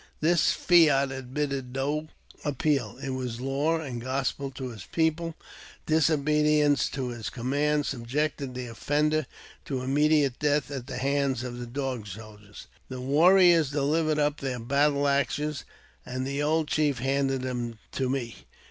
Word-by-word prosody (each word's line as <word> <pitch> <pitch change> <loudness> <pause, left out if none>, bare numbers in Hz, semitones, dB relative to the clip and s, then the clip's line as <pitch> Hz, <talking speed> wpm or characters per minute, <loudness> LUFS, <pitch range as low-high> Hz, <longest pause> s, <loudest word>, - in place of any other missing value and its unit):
This 165 +1 +3
fiat 145 -6 +4
admitted 135 0 -4
no 145 +3 -1 0.4
appeal; 140 -5 0
it 135 - -3
was 125 -3 -4
law 140 +5 0
and 130 -7 -5
gospel 135 +2 -2
to 130 -1 -6
his 110 -5 -9
people; 165 0 0 0.5
disobedience 150 -2 +3
to 130 -2 -3
his 115 -5 -5
command 145 +6 0
subjected 135 +1 -2
the 125 0 -4
offender 145 +5 0 0.4
to 130 -3 -3
immediate 145 0 +2
death 145 -2 +1
at 130 -3 -5
the - - -5
hands 135 -1 0
of 120 -1 -6
the 120 - -6
Dog 130 -3 -4
Soldiers. 105 0 -11 0.2
The 130 -1 -6
warriors 165 +3 +5
delivered 150 +2 +1
up 150 0 +1
their 130 -2 -3
battle 140 +4 +2
axes, 140 +1 0 0.4
and 130 +1 -4
the 140 +1 -2
old 155 +1 +1
chief 145 -2 +1
handed 135 +1 0
them 120 -3 -3
to 130 -2 -1
me. 125 -3 -4
140 Hz, 145 wpm, -27 LUFS, 125-150 Hz, 0.5 s, warriors